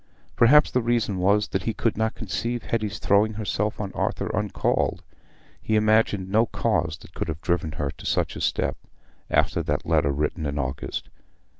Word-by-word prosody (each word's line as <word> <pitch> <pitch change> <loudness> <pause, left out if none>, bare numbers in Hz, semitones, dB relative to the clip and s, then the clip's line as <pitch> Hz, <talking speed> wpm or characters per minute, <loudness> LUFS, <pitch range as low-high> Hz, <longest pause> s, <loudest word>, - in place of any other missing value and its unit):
Perhaps 145 +6 +6
the 125 - +2
reason 115 -4 0
was 100 +3 +2
that 95 - -1
he 115 +3 -2
could 115 - 0
not 110 +1 -1
conceive 120 0 -3
Hetty's 110 -3 -2
throwing 105 +2 +3
herself 105 0 -2
on 100 -2 -4
Arthur - - -2
uncalled; 105 -1 0 0.6
he 110 - 0
imagined 110 -3 +3
no 110 +4 +3
cause 85 -10 0
that 80 - -15
could - - -3
have 80 -1 -4
driven 85 -4 -1
her 70 -2 -2
to - - -13
such - - 0
a - - -6
step, - - 0 0.5
after - - +2
that - - -2
letter 70 - +2
written 75 +2 -2
in 70 0 -3
August. 65 -2 -4
105 Hz, 175 wpm, -25 LUFS, 85-110 Hz, 0.6 s, Perhaps